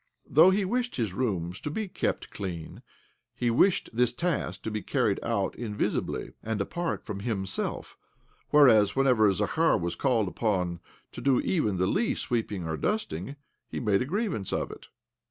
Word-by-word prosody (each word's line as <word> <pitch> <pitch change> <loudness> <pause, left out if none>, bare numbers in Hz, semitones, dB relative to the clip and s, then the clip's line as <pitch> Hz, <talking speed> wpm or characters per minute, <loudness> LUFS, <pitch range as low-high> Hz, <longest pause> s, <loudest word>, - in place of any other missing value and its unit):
Though 160 +7 +7
he 195 +1 +2
wished 245 +4 -1
his 110 -7 -1
rooms 95 -6 -2
to - - -4
be 215 +7 -3
kept - - -2
clean, 85 -5 -6 0.5
he 120 -1 0
wished 180 +11 +3
this 125 +1 +2
task 170 +5 -2
to 110 - -3
be 105 0 -2
carried - - +1
out - - -1
invisibly, 105 -4 -2
and 110 -1 -3
apart 170 +12 -3
from 105 -3 -5
himself; 100 -3 -3 0.5
whereas, 110 -9 +6
whenever 125 -6 +4
Zakhar 160 - +2
was 85 -3 -2
called 120 -7 +1
upon 90 -2 -1 0.3
to - - -8
do 135 -2 +3
even 110 - 0
the 90 - +2
least 215 - 0
sweeping 105 -7 -2
or 80 -1 -2
dusting, 140 - -2 0.3
he - - -5
made 105 -4 +2
a - - 0
grievance 180 - -2
of - - -1
it. - - -11
115 Hz, 165 wpm, -28 LUFS, 95-150 Hz, 0.5 s, Though